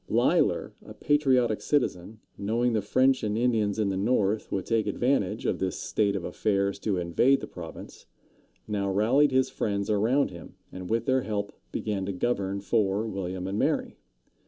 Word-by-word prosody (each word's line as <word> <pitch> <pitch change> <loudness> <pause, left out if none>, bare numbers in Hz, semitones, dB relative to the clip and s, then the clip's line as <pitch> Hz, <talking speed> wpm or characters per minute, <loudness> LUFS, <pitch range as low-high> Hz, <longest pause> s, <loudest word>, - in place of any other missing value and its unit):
Leīs´ler, - - +2
a - - -11
patriotic 130 -7 +2
citizen, 110 -7 -1 0.2
knowing 115 +4 0
the 110 - +1
French 130 +6 +2
and 105 0 -1
Indians 110 -4 +1
in 105 -2 +1
the 95 - -1
north 105 0 0
would 95 -2 -2
take 115 -2 0
advantage 110 -2 0
of - - 0
this 95 -1 -2
state 100 -2 0
of 95 - -3
affairs 100 0 -1
to 100 -2 -1
invade 90 +11 +3
the - - -6
province, 85 -2 -10 0.6
now 100 -2 -1
rallied 120 +9 +3
his 130 0 +2
friends 100 0 -2
around 115 +7 +2
him, 85 -2 -11 0.2
and 90 -1 -8
with 115 +1 0
their 130 0 +2
help 100 -3 -3 0.2
began 105 -3 -2
to 100 - -2
govern 100 -1 -1
for 100 0 +1
William 95 -3 -4
and 100 +2 -2
Mary. - - 0
105 Hz, 170 wpm, -27 LUFS, 100-120 Hz, 0.6 s, invade